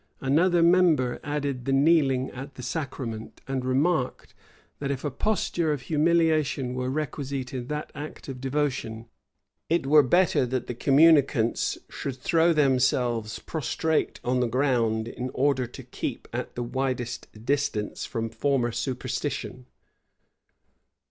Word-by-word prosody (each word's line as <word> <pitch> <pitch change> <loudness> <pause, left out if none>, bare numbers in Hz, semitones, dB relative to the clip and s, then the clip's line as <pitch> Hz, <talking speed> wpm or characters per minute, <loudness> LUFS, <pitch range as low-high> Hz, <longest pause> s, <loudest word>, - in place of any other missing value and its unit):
Another 165 +6 +3
member 170 -8 +4
added 145 -4 -3
the 135 - 0
kneeling 135 -2 +3
at 135 +2 -8
the 125 - -8
sacrament; 125 -5 -5
and 135 -1 -2
remarked, 135 +2 0 0.5
that 140 - -3
if 140 -1 -3
a 145 - -1
posture 170 0 0
of 145 -4 -3
humiliation 155 -5 +2
were 125 0 -2
requisite 140 -2 -3
in 125 -2 -4
that 150 +1 -4
act 150 +1 -8
of 130 -2 -7
devotion, 130 -5 -2 0.6
it 170 -3 +1
were 150 +2 +7
better 175 +4 +3
that 125 0 -2
the - - -4
communicants 140 -3 +3
should 135 -2 -5
throw 165 +5 +3
themselves 125 -6 +2
prostrate 160 +1 -1
on 125 +1 +1
the 125 - +2
ground, 115 -3 +1
in 125 +2 -5
order 130 -2 +2
to 120 - -10
keep - - -5
at - - -4
the 120 - -2
widest 125 -1 -3 0.2
distance 140 -7 -1
from 115 -3 -3
former 130 -2 +1
superstition. 130 0 -4
135 Hz, 135 wpm, -26 LUFS, 125-150 Hz, 0.6 s, were